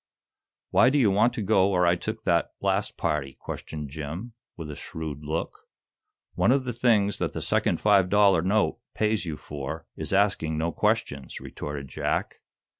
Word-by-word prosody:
"Why 125 - +6
do 145 - +2
you 115 -8 +4
want 105 +5 +4
to 110 - -2
go 100 -2 +4
where 90 -2 +2
I 85 +1 +4
took 85 - -5
that - - +1
last - - 0
party?" 70 -3 -2
questioned 75 -3 -6
Jim, 80 - -6 0.2
with 80 -3 -6
a - - -7
shrewd 75 -2 -6
look. 80 +3 -4 0.7
"One - - +3
of 135 0 +3
the 120 - -2
things 110 -4 +2
that - - -1
the - - -3
second - - +1
five 100 -3 +4
dollar 100 -4 +5
note 100 +4 +1 0.2
pays 105 -4 0
you 75 -2 -4
for 75 +2 -6
is - - -4
asking 95 -6 +2
no 85 +2 0
questions," 70 -3 -1
retorted 70 -1 -6
Jack. - - -2
90 Hz, 175 wpm, -26 LUFS, 75-105 Hz, 0.7 s, Why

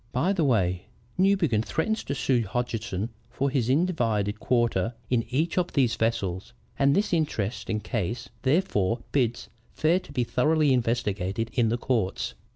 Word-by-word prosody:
By 160 +11 +2
the 175 -5 +1
way, 95 -9 +1 0.3
Newbegin 185 - +3
threatens 220 - -1
to 140 - -2
sue 130 -2 +2
Hodgeson 110 -1 -3 0.2
for 135 +3 -1
his 130 -4 0
individed 115 - +1
quarter 120 -3 +1 0.2
in 120 -2 +3
each 160 +8 +1
of 175 - -2
these 130 -5 +3
vessels, 100 -2 -1 0.3
and 140 +1 +4
this 205 -1 +1
interesting 115 - -1
case 115 +1 -3
therefore 130 - +1
bids 120 -3 0 0.3
fair 165 +4 +3
to 165 - -15
be 130 -3 0
thoroughly 150 +4 +2
investigated 115 -3 -1
in 120 -3 +2
the 120 - 0
courts. 115 -6 -1
120 Hz, 150 wpm, -26 LUFS, 110-145 Hz, 0.3 s, and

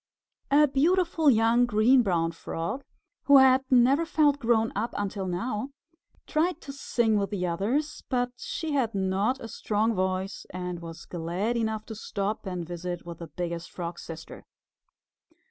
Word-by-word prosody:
A 295 +2 +6
beautiful 325 +2 +3
young 230 0 +4
Green 240 +4 +5
Brown 170 -6 +1
Frog, 165 +9 -4 0.4
who 280 0 +8
had 265 0 +6
never 260 +5 +5
felt 300 -3 +2
grown 225 -2 +2
up 230 +1 -2
until 200 -1 -3
now, 210 +7 -2 0.6
tried 320 +2 0
to 275 - -8
sing 230 -5 +1
with 200 - -1
the 190 -4 -2
others, 220 - -1
but 245 -1 0
she 320 +5 -4
had 250 -7 0
not 195 +6 0
a 230 - -7
strong 220 +1 0
voice, 185 0 -2
and 180 -1 -5
was 165 -1 -9
glad 180 +7 -2
enough 220 -2 -1
to 225 - -7
stop 205 -1 -3
and 180 -3 -4
visit 175 0 -5
with 170 -1 -8
the 170 - -7
Biggest 170 +2 -5
Frog's 170 -1 -6
Sister. 160 -1 -9
215 Hz, 155 wpm, -27 LUFS, 180-260 Hz, 0.6 s, who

